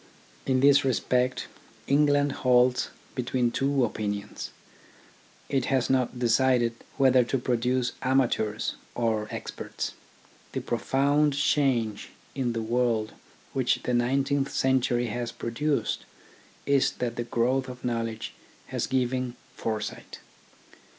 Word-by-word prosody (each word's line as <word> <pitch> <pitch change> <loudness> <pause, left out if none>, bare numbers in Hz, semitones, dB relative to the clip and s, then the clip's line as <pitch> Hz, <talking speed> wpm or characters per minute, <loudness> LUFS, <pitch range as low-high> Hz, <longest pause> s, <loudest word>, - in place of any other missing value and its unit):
In 130 -1 +2
this 140 0 +6
respect 125 -1 +1 0.4
England 145 0 +3
halts 125 0 +4 0.2
between 125 -1 0
two 135 -1 +2
opinions. 105 -2 -4 1.0
It 135 -3 0
has 130 -2 +1
not 130 -1 +1
decided 120 0 +3 0.2
whether 130 -2 +5
to 135 - 0
produce 125 0 0
amateurs 120 -5 +1 0.2
or 110 -3 0
experts. - - -5 0.6
The - - -2
profound 140 +6 +2
change 130 -7 +1 0.2
in 125 -4 -1
the 115 -1 -2
world 115 -2 0 0.4
which 130 -2 +1
the 125 - -1
nineteenth 135 +3 +1
century 125 -2 +2
has 120 +1 -3
produced 140 +6 -1 0.6
is 140 -1 +3
that 120 -1 -3
the 120 - -2
growth 125 +3 0
of 125 0 -8
knowledge 115 -2 -2 0.4
has - - -1
given 130 -1 0 0.2
foresight. 110 -2 -4
125 Hz, 110 wpm, -27 LUFS, 120-135 Hz, 1.0 s, this